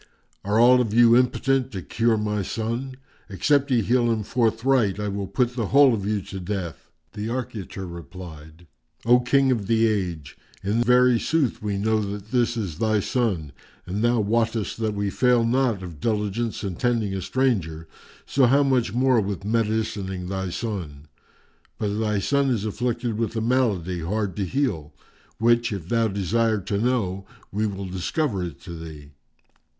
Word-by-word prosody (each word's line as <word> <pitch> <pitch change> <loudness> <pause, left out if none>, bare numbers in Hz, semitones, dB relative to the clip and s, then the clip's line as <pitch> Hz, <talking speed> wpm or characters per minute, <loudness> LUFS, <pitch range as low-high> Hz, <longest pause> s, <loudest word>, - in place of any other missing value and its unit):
Are 105 +3 +1
all 125 +2 +6
of 110 -3 -2
you 120 0 +7
impotent 130 +1 +2
to 95 -3 -5
cure 115 +3 +1
my 105 -1 -1
son? 115 +6 -3 0.3
Except 140 +8 +1
ye 120 -4 +2
heal 120 +1 +2
him 110 -2 -1
forthright, 115 -2 +1
I 105 - -2
will 100 -1 -3
put 120 +5 0
the 115 -5 -1
whole 140 0 +6
of 100 -3 -2
you 105 -2 -1
to 95 - -7
death." 90 -5 -5 0.2
The 105 +2 -4
Archiater 110 -6 -5
replied, 85 -1 -10 0.4
"O 120 +1 +6
King 135 +2 +3
of 110 -6 -1
the 115 0 +3
Age, 90 -9 -2 0.2
in 105 +4 +1
very 125 0 +4
sooth 155 -4 0
we 105 -2 -2
know 110 +2 +1
that 100 +1 -6
this 120 -2 +1
is 90 -8 -4
thy 110 -1 +2
son 100 - -1 0.3
and 100 +5 -3
thou 120 0 +3
wottest 110 0 0
that 110 -2 -1
we 100 -1 -1
fail 125 0 +3
not 120 -5 +1
of 85 -5 -9
diligence 110 +2 -2
in 95 -4 -4
tending 115 -5 0
a 95 - -3
stranger; 90 -10 -1 0.4
so 135 -2 +3
how 140 +4 +4
much 125 -6 +1
more 130 -2 +3
with 100 -1 -4
medicining 105 -4 -1
thy 95 -1 -3
son? 85 -9 -5 0.7
But 105 0 -2
thy 105 -2 0
son 140 +7 +1
is 110 -5 0
afflicted 120 +1 -2
with 115 0 -2
a 110 - -1
malady 110 -8 0
hard 100 +2 -2
to 100 - 0
heal, 95 - -2 0.4
which, 120 +1 +2
if 95 -4 -5
thou 115 -1 +2
desire 110 +3 0
to 100 +1 -2
know, 100 -6 -1 0.2
we 105 +2 0
will 100 -1 -5
discover 95 - -2
it 85 - -6
to - - -10
thee." 80 -3 -10
110 Hz, 170 wpm, -24 LUFS, 95-120 Hz, 0.7 s, you